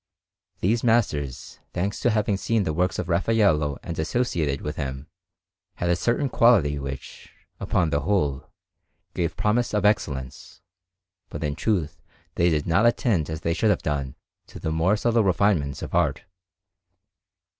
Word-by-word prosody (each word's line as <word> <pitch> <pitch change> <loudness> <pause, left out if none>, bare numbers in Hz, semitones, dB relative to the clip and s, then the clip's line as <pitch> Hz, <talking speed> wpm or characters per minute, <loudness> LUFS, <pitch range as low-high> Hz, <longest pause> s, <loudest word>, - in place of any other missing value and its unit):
These 110 +5 +1
masters, 90 - 0
thanks 95 +4 -2
to 120 - +2
having 105 -2 +1
seen 110 +2 0
the 80 - -1
works 90 +3 0
of 90 - -3
Raffaello 85 -6 +2
and 85 - -5
associated 80 - -1
with 75 0 -4
him, 65 -1 -5 0.7
had 85 0 -1
a - - +3
certain 120 - 0
quality 100 - +3
which, 70 -1 -8 0.3
upon 85 -4 0
the 70 - +1
whole, 75 -8 -1 0.6
gave 85 -2 -2
promise 115 +2 +1
of 105 -1 +1
excellence, 75 - -2 0.7
but 75 - -6
in 75 -1 -1
truth 85 -2 -1 0.3
they 85 - +2
did 75 -3 0
not 100 +7 +3
attend 105 - +1
as 80 0 -5
they 85 - 0
should 100 +6 +1
have 105 - +1
done 70 -3 -2 0.3
to - - -12
the 80 - -3
more 85 +6 +2
subtle 115 +1 +2
refinements 90 -7 +1
of - - -7
art. - - +1
85 Hz, 155 wpm, -24 LUFS, 75-105 Hz, 0.7 s, a